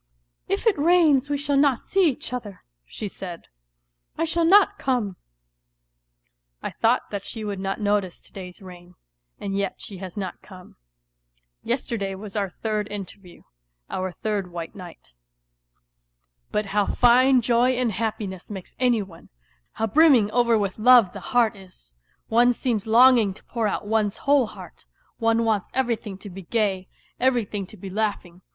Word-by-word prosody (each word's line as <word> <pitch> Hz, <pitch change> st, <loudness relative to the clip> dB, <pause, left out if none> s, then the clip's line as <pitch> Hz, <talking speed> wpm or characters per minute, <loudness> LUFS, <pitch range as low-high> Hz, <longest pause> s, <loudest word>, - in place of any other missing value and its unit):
"If -, -, -2 dB
it 425 Hz, -9 st, +3 dB
rains 305 Hz, -4 st, +4 dB
we 290 Hz, -, 0 dB
shall 285 Hz, 0 st, 0 dB
not 275 Hz, -3 st, +3 dB
see 380 Hz, -4 st, +3 dB
each 250 Hz, -2 st, -6 dB
other," 210 Hz, -6 st, -6 dB, 0.2 s
she 210 Hz, -, -6 dB
said, 180 Hz, -3 st, -8 dB, 0.4 s
" -, -, -47 dB
I -, -, +1 dB
shall 335 Hz, +1 st, +1 dB
not 405 Hz, +3 st, +5 dB
come." 240 Hz, -8 st, -1 dB, 1.5 s
I -, -, -3 dB
thought 235 Hz, +3 st, +1 dB
that 200 Hz, -2 st, -4 dB
she 220 Hz, +1 st, -7 dB
would 205 Hz, -2 st, -4 dB
not 195 Hz, 0 st, -3 dB
notice 205 Hz, -3 st, 0 dB
to -, -, -18 dB
day's 185 Hz, +1 st, -10 dB
rain, 180 Hz, -1 st, -13 dB, 0.4 s
and 195 Hz, -1 st, -4 dB
yet 200 Hz, -1 st, -1 dB
she 200 Hz, -, -9 dB
has 190 Hz, 0 st, -8 dB
not 190 Hz, -3 st, -5 dB
come. 185 Hz, -2 st, -13 dB
^. -, -, -23 dB, 0.9 s
Yesterday 230 Hz, -6 st, -2 dB
was 200 Hz, +1 st, -10 dB
our 200 Hz, -2 st, -1 dB
third 210 Hz, +1 st, -3 dB
interview, 195 Hz, -2 st, -9 dB, 0.5 s
our 185 Hz, 0 st, -2 dB
third 200 Hz, -1 st, -3 dB
white 170 Hz, -1 st, -6 dB
night.... 180 Hz, -5 st, -12 dB
^ -, -, -31 dB, 1.4 s
But 210 Hz, -, 0 dB
how 205 Hz, -1 st, +2 dB
fine 255 Hz, +2 st, +5 dB
joy 240 Hz, +2 st, +3 dB
and 245 Hz, -2 st, 0 dB
happiness 205 Hz, -3 st, -4 dB
makes 195 Hz, -4 st, -8 dB
any 245 Hz, -4 st, +2 dB
one! 170 Hz, -4 st, -15 dB, 0.4 s
How 225 Hz, -, -1 dB
brim 310 Hz, +8 st, +5 dB
ming 210 Hz, -5 st, +3 dB
over 235 Hz, -1 st, +3 dB
with 200 Hz, -1 st, -2 dB
love 240 Hz, -4 st, +6 dB
the -, -, -7 dB
heart 240 Hz, -4 st, +1 dB
is! 185 Hz, -, -17 dB, 0.3 s
One 240 Hz, +2 st, +4 dB
seems 230 Hz, -4 st, -2 dB
longing 230 Hz, -3 st, +5 dB
to -, -, -14 dB
pour 230 Hz, -3 st, -2 dB
out 205 Hz, -, -3 dB
one's 210 Hz, -1 st, 0 dB
whole 280 Hz, -4 st, +4 dB
heart; -, -, -12 dB, 0.3 s
one 225 Hz, 0 st, +2 dB
wants 215 Hz, -4 st, 0 dB
everything 235 Hz, -6 st, -1 dB
to -, -, -6 dB
be 195 Hz, +2 st, -8 dB
gay, 195 Hz, -1 st, -1 dB, 0.3 s
every 250 Hz, -3 st, +2 dB
thing 200 Hz, -1 st, -5 dB
to 215 Hz, -, -14 dB
be 190 Hz, +1 st, -8 dB
laughing. 195 Hz, -4 st, -3 dB
215 Hz, 170 wpm, -24 LUFS, 195-245 Hz, 1.5 s, love